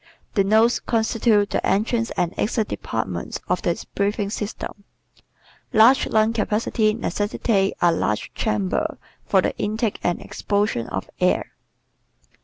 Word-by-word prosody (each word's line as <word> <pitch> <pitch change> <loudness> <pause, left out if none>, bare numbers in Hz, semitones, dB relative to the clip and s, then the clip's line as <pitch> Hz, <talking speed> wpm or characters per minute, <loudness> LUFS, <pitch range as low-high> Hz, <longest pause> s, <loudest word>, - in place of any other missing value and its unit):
The 200 - +3
nose 220 +4 +4
constitutes 220 -2 +1
the - - 0
entrance 230 +3 +1
and 175 0 0
exit 220 0 0
departments 95 -6 -4
of 180 0 0
the 170 - -2
breathing 200 0 0
system. 210 -1 -5 0.9
Large 235 +4 +6
lung 220 +1 +2
capacity 215 0 +1
necessitates 205 -1 0
a 175 - +6
large 105 -10 -1
chamber 100 -3 -1 0.3
for - - +3
the - - -1
intake 215 +1 -1
and 175 - 0
expulsion 200 - -1
of - - -4
air. - - +1
210 Hz, 125 wpm, -23 LUFS, 195-225 Hz, 0.9 s, Large